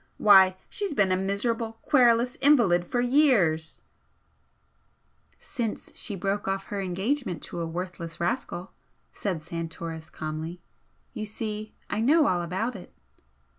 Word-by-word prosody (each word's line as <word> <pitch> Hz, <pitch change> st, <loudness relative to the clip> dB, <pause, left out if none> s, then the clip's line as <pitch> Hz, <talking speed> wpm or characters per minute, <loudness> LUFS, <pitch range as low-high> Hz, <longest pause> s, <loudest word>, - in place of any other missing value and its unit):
"Why, 190 Hz, -2 st, +7 dB
she's 400 Hz, -7 st, -3 dB
been 195 Hz, -5 st, +3 dB
a -, -, +4 dB
miserable, 220 Hz, +4 st, -1 dB
querulous 245 Hz, -3 st, +4 dB
invalid 230 Hz, -12 st, +4 dB
for 245 Hz, -, 0 dB
years 240 Hz, -, +2 dB, 0.8 s
" -, -, -43 dB, 0.6 s
"Since 230 Hz, -4 st, -5 dB
she 205 Hz, -, -3 dB
broke 195 Hz, +2 st, -2 dB
off 195 Hz, 0 st, -1 dB
her 200 Hz, -, -1 dB
engagement 195 Hz, -, -2 dB
to -, -, -6 dB
a 165 Hz, -, -2 dB
worthless 170 Hz, -1 st, -6 dB
rascal" 175 Hz, 0 st, -2 dB, 0.4 s
said 180 Hz, -6 st, -3 dB
Santoris, 165 Hz, -1 st, -6 dB
calmly. 155 Hz, +3 st, -5 dB, 0.5 s
"You 215 Hz, -, -5 dB
see, 215 Hz, 0 st, -5 dB
I 205 Hz, -, -2 dB
know 300 Hz, +6 st, +5 dB
all 180 Hz, -1 st, +2 dB
about 190 Hz, +8 st, -2 dB
it." 185 Hz, -, -10 dB
195 Hz, 130 wpm, -27 LUFS, 175-235 Hz, 0.8 s, Why